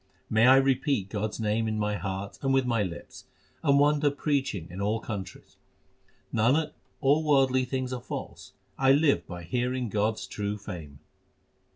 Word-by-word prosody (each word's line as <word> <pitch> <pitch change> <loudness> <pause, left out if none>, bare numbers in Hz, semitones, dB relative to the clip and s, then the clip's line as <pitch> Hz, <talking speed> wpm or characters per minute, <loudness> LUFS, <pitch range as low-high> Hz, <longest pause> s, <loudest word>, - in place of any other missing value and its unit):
May 110 +2 +5
I 130 - +8
repeat 135 -5 +2
God 110 0 -1
s - - -9
name 110 +1 0
in 110 0 -1
my 105 0 0
heart 95 +1 -5
and 135 - 0
with 135 -1 +3
my 115 -3 +1
lips, 90 -4 -6 0.4
and 140 -3 +4
wander 145 +1 +4
preaching 140 - -1
in 95 +3 -6
all 105 +3 0
countries! 100 -5 -7 0.8
Nanak, 135 +8 +2 0.3
all 145 +3 +3
worldly 135 -3 +3
things 130 0 -3
are 125 - -4
false; - - -7 0.3
I 135 0 +5
live 145 0 +2
by 90 -1 -7
hearing 125 +6 -1
God 105 +2 +1
s - - -7
true 105 0 -4
fame. 80 -8 -9
120 Hz, 170 wpm, -28 LUFS, 105-135 Hz, 0.8 s, I